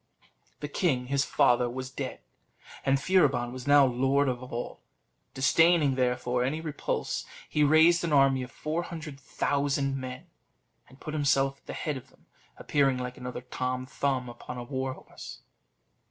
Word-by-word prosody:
The 145 - -3
king 140 -5 0
his 140 0 +2
father 125 -4 +3
was 130 +2 -6
dead, - - -5 0.6
and 135 0 +2
Furibon 140 -8 +2
was 130 +1 -8
now 145 -1 +7
lord 135 +3 +2
of 125 -1 -2
all: 120 -1 -6 0.5
disdaining, 160 +1 +4
therefore, 125 -1 0
any 140 +5 -1
repulse, 155 -3 -3 0.2
he 150 - +1
raised 160 +4 +5
an 170 - -1
army 135 -2 +4
of 125 - -6
four 155 +6 -3
hundred 160 -5 -8
thousand 140 0 -1
men, 130 -1 -6 0.6
and 130 - -18
put 155 - -7
himself 140 -2 +1
at - - -37
the - - -5
head 150 -3 -3
of 130 - -12
them, - - -27 0.3
appearing 135 -3 +1
like 125 0 -5
another 125 0 -6
Tom 125 0 -3
Thumb 130 -1 -1
upon 120 +1 -8
a 120 - -5
war 130 +1 -3
horse. - - -11
135 Hz, 160 wpm, -28 LUFS, 125-145 Hz, 0.6 s, now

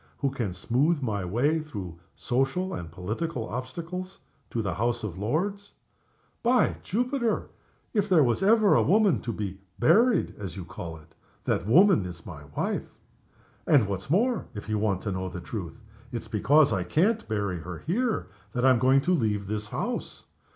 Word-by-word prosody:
who 140 -2 0
can 115 -8 -2
smooth 135 - +1
my 105 -7 -2
way 125 - +1
through 100 - -7 0.2
social 135 +10 0
obstacles - - -3
and 85 -2 -8
political 110 - -3
obstacles, 170 +9 -5 0.3
to 115 - -2
the 95 -3 -1
House 120 +5 -1
of 95 -4 -5
Lords? 195 - -2 0.7
By 245 -1 +3
Jupiter! 245 +2 -1 0.4
if 205 -3 +2
ever 190 -3 +2
there 155 - +7
was 120 +3 +1
a 205 +4 +6 0.3
woman 205 -2 +3
to 120 - -3
be 100 -3 -5 0.2
'buried' 220 - +4
(as 95 -4 -5
you 95 - -6
call 85 -2 -7
it), 80 0 -19 0.3
that 90 - 0
woman 180 - +6
is 85 -2 -9
my 75 -1 -9
wife. - - -1 0.8
And, 135 -9 +5
what's 100 +5 -4
more, 230 - +2
if 105 - -7
you 110 -1 0
want 100 -3 0
the 95 -3 -3
truth, 95 +2 -6 0.3
it's 120 - -4
because 140 +5 +4
I 95 -3 0
can't 205 - +1
bury 100 -5 -1
her 85 +1 -8
here 225 +7 0 0.3
that 125 -1 +1
I'm 130 -3 +5
going 130 +2 +4
to 180 +6 +1
leave 105 - 0
this 105 +1 -3
house. - - -4
120 Hz, 170 wpm, -27 LUFS, -, 0.8 s, there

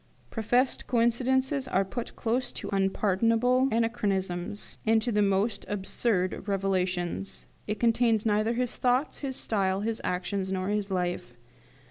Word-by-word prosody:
Professed 245 +4 +1
coincidences 260 +3 +1
are 195 -5 +1
put 235 +5 -6
close 245 +2 -1
to - - -6
unpardonable 225 +6 +2
anachronisms, 205 -5 -1
and 225 0 +4
to 235 +2 -2
the 210 -1 +2
most 200 +1 +1
absurd 195 -1 -1
revelations. 190 -2 -1 0.2
It 210 0 -2
contains 230 -2 +2
neither 215 +1 +2
his 245 0 -2
thoughts, 255 +3 +1
his 270 -2 -3
style, 195 -4 0
his 225 +1 -2
actions, 190 +1 -2
nor 185 0 -1
his 205 -1 -1
life. 180 -9 -2
210 Hz, 130 wpm, -28 LUFS, 190-240 Hz, 0.2 s, and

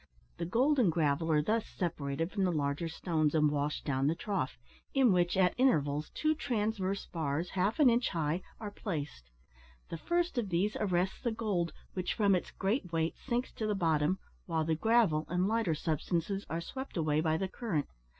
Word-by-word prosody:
The 170 - -2
gold 265 - +3
and 205 -9 +4
gravel 160 0 +1
are 150 -1 +3
thus 220 +6 0
separated 165 -2 -2
from 200 -2 0
the 185 - +2
larger 145 +1 -1
stones, 160 -2 0
and 150 -1 +4
washed 145 0 -2
down 135 -1 +1
the 160 - +2
trough, 190 -9 -2 0.4
in 260 -6 +5
which, 175 +1 +2
at 185 -1 +4
intervals, 150 - +2
two 310 0 +2
transverse 210 -8 -1
bars, 160 +1 -2
half 195 +6 0
an 295 - +7
inch 240 0 +3
high, 165 0 -1 0.2
are 210 -2 -5
placed; 150 - -5 0.6
the 165 - -5
first 345 - 0
of 210 -5 -2
these 190 +4 +1
arrests 185 -2 0
the 235 - 0
gold, 205 -7 -1 0.2
which, 185 -1 -2
from 200 -2 +3
its 180 - 0
great 195 -2 -1
weight, 165 0 0
sinks 245 -1 -2
to 215 - -3
the 210 - +1
bottom, 165 -1 +2 0.3
while 165 -2 0
the 160 - +1
gravel 195 -4 +3
and 180 +2 +1
lighter 220 -7 +1
substances 170 +5 -2
are 165 +2 -2
swept 265 +4 -6
away 155 -2 +2
by 160 -1 +1
the 190 - -1
current. 185 - -2
180 Hz, 190 wpm, -32 LUFS, 155-215 Hz, 0.6 s, an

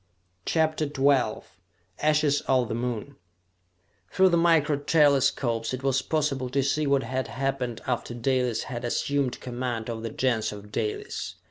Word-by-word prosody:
CHAPTER 155 -1 +1
XII 140 -2 +2 0.6
Ashes 150 -1 +2
of 130 -3 +2
the - - -2
Moon 120 +3 -4 0.9
Through 190 0 +5
the 170 - +3
micro 165 -3 +3
telescopes 140 -6 +2
it 130 - -10
was 135 -1 +2
possible 140 -4 -1
to 135 +2 +1
see 150 +2 0
what 140 -1 +2
had 130 +2 -2
happened 135 -3 -3
after 120 -1 -2
Dalis 125 -1 0
had 120 -1 -6
assumed 135 +2 -1
command 120 -2 -3
of 110 -1 -5
the 115 - -4
Gens 115 -1 0
of 105 0 -10
Dalis. 105 0 -3
130 Hz, 145 wpm, -26 LUFS, 120-145 Hz, 0.9 s, Through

